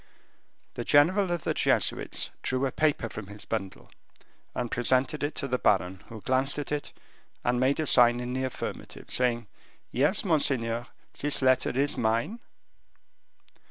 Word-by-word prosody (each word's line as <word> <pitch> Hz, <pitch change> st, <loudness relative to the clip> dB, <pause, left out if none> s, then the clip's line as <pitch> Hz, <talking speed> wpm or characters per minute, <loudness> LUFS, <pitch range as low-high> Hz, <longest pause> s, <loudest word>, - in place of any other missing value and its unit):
The -, -, -4 dB
general 180 Hz, +7 st, +4 dB
of 175 Hz, -2 st, -2 dB
the -, -, 0 dB
Jesuits -, -, +2 dB
drew 130 Hz, +1 st, -1 dB
a 135 Hz, -, -1 dB
paper 155 Hz, -5 st, 0 dB
from 105 Hz, -3 st, -8 dB
his 105 Hz, +1 st, -9 dB
bundle, 100 Hz, -4 st, -5 dB, 0.6 s
and 120 Hz, -2 st, -3 dB
presented 130 Hz, +5 st, +1 dB
it 145 Hz, +1 st, -2 dB
to 140 Hz, -, -2 dB
the 125 Hz, -1 st, -1 dB
baron, 95 Hz, -1 st, +1 dB
who 110 Hz, -2 st, -10 dB
glanced 130 Hz, +4 st, +1 dB
at 145 Hz, -, -5 dB
it, 150 Hz, -1 st, -3 dB, 0.5 s
and 120 Hz, 0 st, +1 dB
made 130 Hz, +3 st, +2 dB
a 155 Hz, -, 0 dB
sign 120 Hz, -3 st, +6 dB
in 125 Hz, 0 st, -4 dB
the 130 Hz, 0 st, -2 dB
affirmative, 130 Hz, -, -7 dB
saying, 120 Hz, -2 st, +1 dB, 0.5 s
"Yes, 150 Hz, -, +1 dB
monseigneur, 125 Hz, -8 st, +1 dB, 0.3 s
this 145 Hz, -1 st, +1 dB
letter 130 Hz, -1 st, +3 dB
is 140 Hz, +3 st, 0 dB
mine." 115 Hz, -, 0 dB
130 Hz, 155 wpm, -27 LUFS, 120-145 Hz, 0.6 s, sign